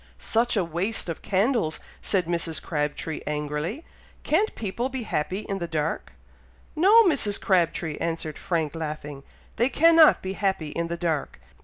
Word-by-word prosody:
"Such 230 - +1
a 195 - +3
waste 175 +5 -2
of 165 - -5
candles!" 205 - +1 0.2
said 185 -4 0
Mrs. 170 -1 -1
Crabtree, 150 0 -3
angrily; 150 - -3 0.4
"can't 395 +9 +1
people 230 +4 -3
be 260 -2 -4
happy 185 +1 -2
in 195 -2 -4
the 170 - -3
dark!" 160 -1 -3 0.6
"No, 405 +8 +7
Mrs. 275 - +2
Crabtree!" 170 -4 +1
answered 165 -2 -3
Frank, 165 -6 -1
laughing. 150 -3 -5 0.4
"They 240 +3 +3
cannot 325 +3 +6
be 190 0 -3
happy 190 -6 -1
in 170 +3 -3
the 170 0 -4
dark! 165 -4 -2
175 Hz, 150 wpm, -25 LUFS, 160-225 Hz, 0.6 s, No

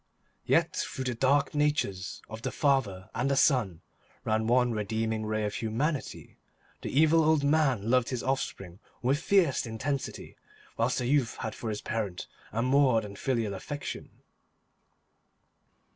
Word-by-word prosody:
Yet - - +2
through 130 - -3
the 125 -1 -1
dark 135 +4 +2
natures 145 -11 -1
of 110 +1 -8
the - - -3
father 110 - 0
and 130 +3 0
the 140 - +2
son 120 - +2 0.4
ran 110 0 +1
one 125 +1 +3
redeeming 110 0 -2
ray 110 0 -1
of 105 - -3
humanity; 135 +7 -3 0.4
the - - -4
evil 160 +3 +4
old 155 -1 +3
man 140 -8 +2
loved 125 0 +3
his 125 -2 -3
offspring 100 -9 -3 0.2
with 135 +4 +2
fierce 170 -11 +2
intensity, 135 +5 -4 0.4
whilst 115 +2 +1
the 125 - -1
youth 135 -2 +1
had 110 - -3
for 115 - -5
his 105 -1 -3
parent 105 -5 -3 0.3
a 115 +2 -1
more 130 -3 +4
than 100 -2 -8
filial 115 -2 -1
affection. 145 +9 -6
125 Hz, 145 wpm, -29 LUFS, 110-140 Hz, 0.4 s, evil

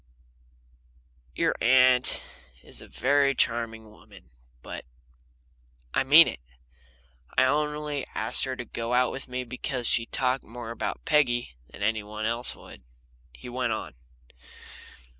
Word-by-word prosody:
Your - - +2
aunt's 125 0 +5 0.6
a - - -12
very 140 +2 +2
charming 115 -2 -1
woman, 105 -6 -17 0.3
but - - -7 1.1
I - - +2
mean 150 +5 +8
it. - - -5 1.0
I - - +6
only 150 +1 -1
asked - - +1
her 130 -1 -3
to 120 - -6
go 115 +1 -4
out 125 -1 +3
with 135 - -7
me 125 0 -3
because 125 0 -4
she 115 0 +2
talked 130 0 0
more 115 0 -8
about 115 - -4
Peggy 125 - +2
than 100 - -8
anybody 110 0 -1
else 120 +2 -2
would," 65 - -14 0.5
he - - -12
went 120 -1 -1
on. 110 - -5
125 Hz, 125 wpm, -27 LUFS, 115-130 Hz, 1.1 s, mean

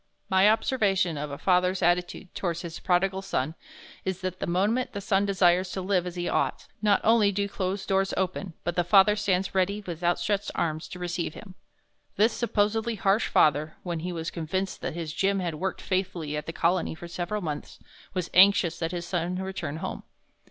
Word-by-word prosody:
My 190 +2 +6
observation 205 -6 +2
of 150 0 -4
a 140 - -6
father's 185 +1 +2
attitude 175 +1 0
towards 170 -2 -3
his 170 -1 -6
prodigal 190 +1 +1
son 155 -6 -2 0.5
is 190 0 -3
that 185 -1 -4
the - - -3
moment 210 +9 +1
the 200 - -3
son 200 0 +1
desires 185 -1 +3
to 190 - -3
live 185 -2 +1
as 180 - -6
he 175 0 -2
ought, - - 0 0.2
not 205 -2 +3
only 220 -2 +4
do 200 +1 -1
closed 195 0 -3
doors 195 0 +1
open, 190 -2 -2
but 175 0 -2
the 175 - +2
father 195 +3 +6
stands 195 -3 0
ready 195 +2 +1
with 175 -1 -6
outstretched 195 +4 +1
arms 155 -1 -1
to - - -8
receive 175 -2 -3
him. 195 -4 -11 0.6
This 220 +2 +3
supposedly 225 0 0
harsh 200 +1 +2
father, 150 +1 +3
when 175 -3 -3
he 180 +3 -4
was 165 -1 -4
convinced 185 +4 -3
that - - -4
his 165 -3 -4
Jim 195 +3 +1
had 175 -3 -2
worked 185 +5 -3
faithfully 185 -5 -2
at 150 - -4
the - - -2
Colony 170 -1 +1
for 175 +1 -9
several 175 +4 -3
months, 150 -3 -5 0.4
was 180 -2 -2
anxious 185 -3 +5
that 165 -1 -2
his 175 -1 -4
son 175 0 -2
return 185 -5 -4
home. - - -5
185 Hz, 195 wpm, -27 LUFS, 170-195 Hz, 0.6 s, My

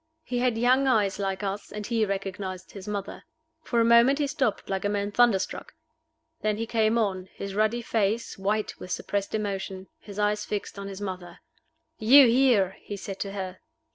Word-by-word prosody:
He 245 -3 -2
had 245 -2 +1
young 255 +3 +3
eyes 210 -6 +2
like 195 0 -2
us, 200 +1 -4
and 210 0 -5
he 225 -2 +1
recognized 190 -1 -4
his 195 -1 -10
mother. 200 -2 -5 0.4
For 240 -6 0
a 230 - +4
moment 235 +4 +6
he 295 - +1
stopped 260 -6 -1
like 190 -1 -2
a 205 - +1
man 205 0 -1
thunderstruck. 225 -4 +1 0.7
Then 215 -1 0
he 225 - -2
came 225 0 +2
on 190 -4 -1
his 200 -1 -6
ruddy 215 +3 +1
face 220 0 0
white 205 +2 -2
with - - -9
suppressed 200 +3 -2
emotion, 195 -2 -4
his 205 -1 -11
eyes 210 0 +1
fixed 205 -1 -4
on 200 - -6
his 195 0 -7
mother. 185 -3 -6 0.6
"You 260 +5 +8
here!" 235 -6 +3
he 205 - -6
said 195 0 -7
to 200 -1 -4
her. 190 -2 -5
205 Hz, 185 wpm, -27 LUFS, 195-230 Hz, 0.7 s, You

